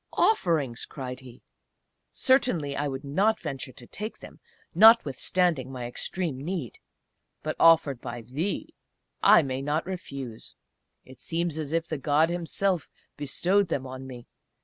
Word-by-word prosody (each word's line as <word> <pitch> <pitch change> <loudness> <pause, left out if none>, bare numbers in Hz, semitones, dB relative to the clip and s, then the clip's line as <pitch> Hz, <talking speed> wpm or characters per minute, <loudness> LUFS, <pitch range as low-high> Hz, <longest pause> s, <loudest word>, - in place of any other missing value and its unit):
"Offerings!" 160 - +1
cried 125 -2 -6
he. 125 -1 -14 0.7
"Certainly 210 - +2
I 145 +1 -1
would 135 0 -5
not 195 +11 +1
venture 140 -5 -5
to 120 - -14
take 215 - -6
them - - -13 0.3
notwithstanding 175 - +4
my 125 -2 -5
extreme 155 +5 -3
need; 165 - -4 0.6
but - - -2
offered 155 -6 +5
by 120 0 -6
thee 150 - -3 0.5
I - - +7
may 130 -1 -3
not 150 +3 -1
refuse; 140 -11 -7 0.5
it 130 0 -15
seems 165 -1 -2
as 150 -2 -4
if 165 0 0
the 155 - -4
God 155 +4 +2
himself 175 +1 -1 0.3
bestowed 180 +7 +1
them 140 -5 -2
on 130 0 -8
me.... 125 -2 -9
150 Hz, 140 wpm, -27 LUFS, 130-175 Hz, 0.7 s, I